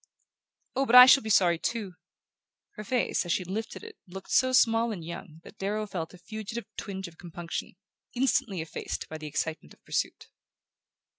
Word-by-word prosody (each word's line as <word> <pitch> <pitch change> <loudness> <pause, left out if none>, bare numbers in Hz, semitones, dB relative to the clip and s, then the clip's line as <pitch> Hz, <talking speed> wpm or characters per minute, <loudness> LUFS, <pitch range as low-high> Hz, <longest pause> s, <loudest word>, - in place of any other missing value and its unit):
"Oh, 270 +1 +1
but 240 - +4
I 250 0 +13
shall 270 +1 +7
be 220 - -6
sorry 175 -5 +4
too!" 210 -4 -3 0.8
Her 215 - -8
face, 245 +3 0
as 175 - -4
she 185 - +1
lifted 210 - -5
it 445 -2 -11
to - - -59
his, 175 - -16
looked 190 - -8
so 255 -1 +4
small 230 -2 +4
and 175 -6 -6
young 170 -1 -9
that - - -15
Darrow 210 +2 -1
felt 180 -4 -5
a - - -13
fugitive 215 +4 -6
twinge 190 -1 -5
of 165 -1 -16
compunction, 170 0 -6 0.4
instantly 235 -7 +1
effaced 160 - -5
by 155 - -6
the 155 - -7
excitement 155 - -4
of - - -40
pursuit. - - -2
195 Hz, 190 wpm, -28 LUFS, 170-230 Hz, 0.8 s, I